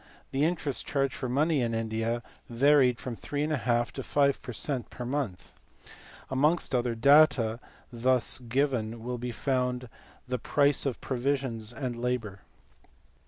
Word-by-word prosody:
The 135 +2 +1
interest 155 -4 -1
charged 135 -3 0
for 130 - -4
money 150 +3 +2
in 115 -1 0
India 115 +1 -2 0.3
varied 130 0 +4
from 125 -2 -5
3 145 +5 -3
to 120 -5 0
5 140 0 +2
per - - -7
cent, 125 +2 -3
per 125 - -7
month. 100 - -3 0.8
Amongst 150 +4 +2
other 120 -2 +1
data 120 -3 +5 0.3
thus 125 +1 +1
given 120 -3 -1
will 125 0 -4
be 125 +1 -4
found 125 -1 -1 0.4
the 125 0 -2
price 140 +3 +2
of 130 - -3
provisions 130 -4 -2
and 125 -1 -4
labour. 120 -5 -2
125 Hz, 135 wpm, -29 LUFS, 115-140 Hz, 0.8 s, data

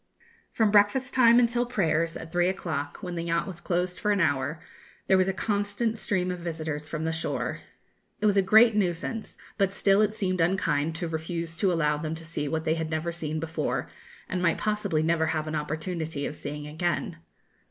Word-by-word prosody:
From 220 -2 +2
breakfast 210 +6 +3
time 235 -2 +6
until 240 0 +3
prayers, 165 -9 0
at 165 - -9
three 175 0 +2
o'clock, 155 -6 -3
when 180 -1 -4
the 170 -1 -3
yacht 170 0 0
was 180 -3 -7
closed 180 0 -1
for 210 - -1
an 205 -1 +3
hour, 145 -1 +1 0.5
there 190 - +4
was 185 0 +3
a - - +2
constant 205 +3 -1
stream 185 -4 -1
of 180 - -5
visitors 155 -3 -4
from 155 -1 -3
the 160 - 0
shore. 160 0 -2 0.6
It - - -1
was 205 -1 +4
a 195 - +5
great 220 +4 +6
nuisance; 200 +3 -2 0.2
but 195 -1 +3
still 195 +1 +3
it 215 0 +1
seemed 185 -4 0
unkind 165 -3 +1
to 170 0 -3
refuse 165 +1 -4
to 190 +2 +2
allow 150 -3 +1
them 155 +1 -3
to 165 0 -10
see 155 -2 -2
what 160 +2 -2
they 160 - +2
had 160 -1 -3
never 160 +2 -2
seen 155 -2 -3
before, 165 +1 -2 0.4
and 185 -2 -2
might 170 -2 +2
possibly 205 -7 0
never 160 0 +2
have 155 -1 -1
an 155 - -4
opportunity 155 0 -3
of 150 - -4
seeing 150 0 -5
again. 170 +5 -2
170 Hz, 200 wpm, -27 LUFS, 160-195 Hz, 0.6 s, time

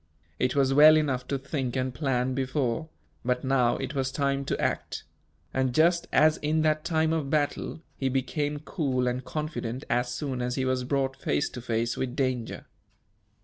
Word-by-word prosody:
It 125 +1 +1
was 135 -1 +3
well 155 +2 +8
enough 130 -5 0
to 140 - -1
think 135 -2 -3
and 130 -1 -1
plan 130 -2 0
before 130 +2 -1 0.3
but 125 0 0
now, 130 -3 +2
it - - -4
was 135 -2 -1
time 140 0 0
to - - -2
act; - - -2 0.5
and, 130 -2 0
just 170 +2 +3
as 155 0 +5
in 155 +1 0
that 155 -1 +2
time 160 -1 +1
of 155 -4 -1
battle, 150 +1 -1 0.2
he 135 - 0
became 145 +3 -1
cool 130 -5 -1
and 125 +1 -1
confident 150 -5 -4
as 120 +1 +1
soon 130 -1 -3
as 125 0 -1
he 130 - 0
was 130 -1 0
brought 135 0 0
face 75 - 0
to 125 - -8
face 115 -1 -1
with 130 -1 -2
danger. 130 -4 -2
135 Hz, 180 wpm, -27 LUFS, 125-150 Hz, 0.5 s, well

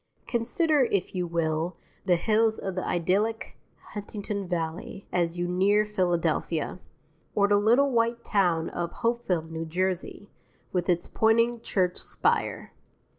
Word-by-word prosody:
Consider, 265 +5 +2
if 200 -5 -1
you 180 -2 -1
will, 165 0 -1 0.3
the 180 -2 +4
hills 220 +4 +2
of 190 - -4
the 185 - -3
idyllic 200 +6 0 0.4
Huntington 205 -1 -5
Valley 170 +2 -4
as 175 -1 0
you 175 0 -1
near 200 +4 +3
Philadelphia; 175 -4 0 0.6
or 200 -1 +4
the 205 0 +4
little 240 +7 +4
white 235 0 +1
town 175 -5 +1
of 170 0 -3
Hopewell, 230 -8 -1
N.J., 180 +4 -3 0.4
with 180 -1 0
its 175 -1 +1
pointing 230 +1 +2
church 180 -4 0
spire. - - -1
190 Hz, 125 wpm, -27 LUFS, 175-220 Hz, 0.6 s, the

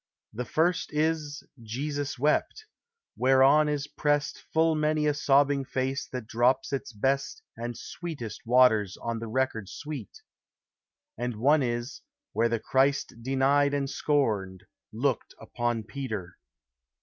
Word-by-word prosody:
The 125 +3 -4
first 170 +8 +1
is 155 -1 -1 0.2
Jesus 140 +5 -3
wept, 150 - 0 0.5
whereon 135 +4 +5
is 145 -1 -1
prest 145 -1 -1
Full 160 0 +3
many 155 0 +1
a 150 - +3
sobbing 140 -1 +3
face 130 +1 -2
that 125 -3 -6
drops 125 +5 +1
its 135 0 -3
best 135 +5 -1
And 120 +1 -5
sweetest 140 - -7
waters 115 -5 +4
on 115 -1 -3
the 115 - -5
record 110 -4 -1
sweet: 145 -8 -8 1.0
And 120 -1 -2
one 145 +7 +4
is, 120 0 -3 0.3
where 115 +2 +2
the 115 -1 0
Christ 135 0 +1
denied 135 +3 +2
and 140 -1 -1
scorned 105 -12 0 0.3
Looked 125 +2 -1
upon 120 -2 -2
Peter. 110 -10 -5
135 Hz, 125 wpm, -28 LUFS, 115-145 Hz, 1.0 s, whereon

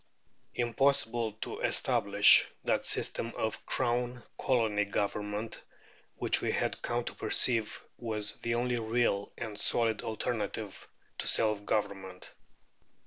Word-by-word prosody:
Impossible 120 -2 +1
to 110 - -6
establish 100 +1 +5
that - - 0
system 115 - 0
of 110 - -3
Crown 120 -1 0
Colony 110 -5 +1
Government 105 +2 -3 0.5
which - - +3
we - - 0
had - - -1
come 120 0 -1
to - - -5
perceive 115 -4 0 0.2
was 110 -3 -1
the 115 0 -2
only 120 0 0
real 110 -3 0
and 110 -3 -6
solid 115 -1 +2
alternative 110 -2 -4 0.3
to - - -2
self 105 -2 +2
government. 95 -3 -3
110 Hz, 115 wpm, -31 LUFS, 105-120 Hz, 0.5 s, establish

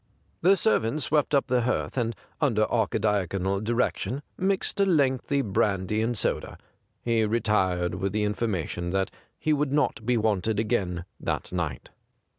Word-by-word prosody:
The 190 +4 +6
ser 220 +4 +3
vant 115 +7 -2
swept 150 0 +2
up 140 - +3
the 125 -1 +1
hearth, 125 +2 -1
and, 115 -3 -1 0.3
under 115 -8 +3
Archidiaconal 100 -3 0
direction, 120 +4 -1
mixed 195 +1 0
a 200 - +5
lengthy 140 -4 +2
brandy 105 -1 0
and 115 +1 0
soda. - - -1 0.5
He 115 -2 +2
retired 105 -6 +1
with 95 0 -2
the 105 0 0
information 100 -5 -2
that 95 +1 0 0.3
he 155 - +1
would 145 -2 0
not 145 -6 +1
be 120 +2 +2
wanted 110 -1 +1
again 95 -6 -1
that - - -3
night. 80 -8 -3
110 Hz, 150 wpm, -26 LUFS, 100-130 Hz, 0.5 s, The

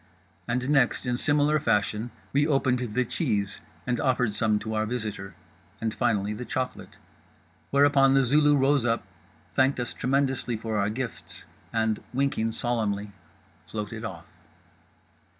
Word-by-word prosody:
And 125 +1 -1
next, 135 -3 +2
in 125 -1 0
similar 150 +3 +2
fashion, 110 -2 0 0.2
we 145 +2 +3
opened 135 -4 +2
the 125 +1 -1
cheese 105 - -1 0.3
and 125 -1 0
offered 125 -4 +1
some 110 0 +2
to 110 +1 -4
our 110 0 0
visitor; 105 -5 -4 0.4
and 110 -1 -1
finally 105 -4 0
the 110 +4 -5
chocolate. 130 +2 -4 0.7
Whereupon 140 -1 +5
The 135 - +5
Zulu 145 +3 +4
rose 140 -1 +3
up, 115 -1 0 0.5
thanked 130 0 +3
us 120 - -3
tremendously 130 -2 0
for 110 0 -3
our 100 +1 +1
gifts, 125 +3 -6 0.3
and—winking 115 +1 0
solemnly—floated 105 -2 -4
off. - - -6
120 Hz, 130 wpm, -27 LUFS, 110-135 Hz, 0.7 s, Whereupon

